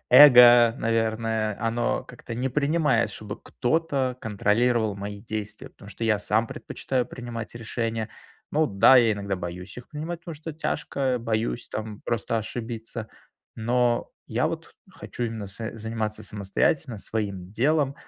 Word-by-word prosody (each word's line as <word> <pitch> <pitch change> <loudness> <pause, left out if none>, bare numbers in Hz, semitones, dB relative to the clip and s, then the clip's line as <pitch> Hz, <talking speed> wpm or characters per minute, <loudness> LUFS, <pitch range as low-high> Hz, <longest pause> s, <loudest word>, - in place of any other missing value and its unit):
эго, 120 -4 +9
наверное, 110 -2 0
оно 115 +1 0
как-то 120 -1 -9
не 125 +3 -1
принимает, 145 -5 +2
чтобы 105 0 -6
кто-то 135 -2 0
контролировал 110 +1 +1
мои 100 0 -6
действия. 110 -1 -6
Потому 100 - -14
что 115 - -5
я 110 -2 +3
сам 110 +2 +1
предпочитаю 125 +2 -3
принимать 120 -2 -7
решения. 115 -1 -3 0.4
Ну 155 +1 +3
да, 100 +4 +6
я 115 -3 +5
иногда 100 -1 -3
боюсь 90 +3 -7
их 125 - -12
принимать, 160 +2 -5
потому 165 -1 -7
что 160 +2 -7
тяжко. 140 -4 -1
Боюсь 110 - -2
там 110 -1 -5
просто 115 0 -1
ошибиться. 115 0 -5 0.5
Но 120 +1 +1 0.2
я - - 0
вот - - -7 0.2
хочу - - -7
именно 110 -3 -4
с 110 +4 -7
заниматься 110 -1 -3
самостоятельно 105 +4 0
своим 100 -4 -4
делом. 140 +4 +2
115 Hz, 140 wpm, -26 LUFS, 110-125 Hz, 0.5 s, эго